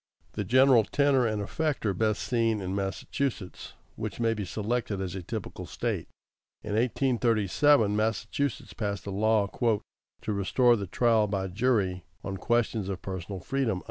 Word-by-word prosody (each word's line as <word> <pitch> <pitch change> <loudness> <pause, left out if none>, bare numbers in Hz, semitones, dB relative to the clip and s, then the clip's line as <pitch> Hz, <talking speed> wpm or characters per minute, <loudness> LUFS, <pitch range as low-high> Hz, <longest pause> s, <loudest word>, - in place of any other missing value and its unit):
The - - -3
general 130 -2 +5
tenor 135 +1 +2
and 105 -2 -1
effect 150 +4 -2
are 100 - +2
best 110 +2 0
seen 115 -3 +1
in 95 -1 -3
Massachusetts, 100 +2 -3 0.2
which - - -5
may 115 -1 +2
be 105 -3 -4
selected 110 +1 -2
as 95 -2 -3
a 95 - -4
typical 85 - -6
State. - - -3 0.6
In 105 - -5
1837, 115 0 +3
Massachusetts 110 +6 -1
passed 100 -3 -3
a 100 - -4
law 105 +1 +2
"to 110 -1 -3
restore 120 +5 +3
the 100 -3 -4
trial 110 +2 +3
by 95 -1 -2
jury, 95 -4 +1 0.2
on 95 -1 -4
questions 115 -3 0
of 95 -2 -5
personal 95 0 -5
freedom." 125 -4 -1
110 Hz, 150 wpm, -28 LUFS, 100-120 Hz, 0.6 s, general